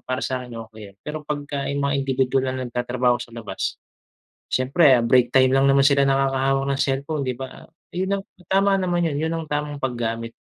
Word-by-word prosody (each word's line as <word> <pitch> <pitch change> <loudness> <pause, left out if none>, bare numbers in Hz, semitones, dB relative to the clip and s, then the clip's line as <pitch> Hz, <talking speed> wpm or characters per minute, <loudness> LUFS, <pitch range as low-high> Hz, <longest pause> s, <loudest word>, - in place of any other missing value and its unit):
para 130 +1 -1
sakin 125 -2 -4 0.2
okey 110 - -13
yun. 100 - -19
Pero 155 +1 -4
pagka 145 -1 -4
yung 140 0 -1
mga 140 0 +1
indibidwal 130 0 +1
na 130 - -2
nagtatrabaho 120 0 0
sa 125 - -7
labas, 110 -5 -4 0.8
siyempre 130 -1 +4
break 120 +1 +3
time 130 -1 +6
lang 135 +1 +3
naman 140 0 +5
sila 140 0 +4
nakakahawak 135 0 +1
ng - - 0
cellphone, 140 +2 -2
'di 130 - -1
ba? 130 +1 -9 0.2
Yun 190 +2 -1
ang - - -20 0.2
tama 195 +1 +3
naman 175 -2 0
yun. 160 -4 0
Yun 160 +2 -1
ang 165 -1 -3
tamang 150 -1 -3
paggamit 115 -2 -3
135 Hz, 190 wpm, -23 LUFS, 125-145 Hz, 0.8 s, time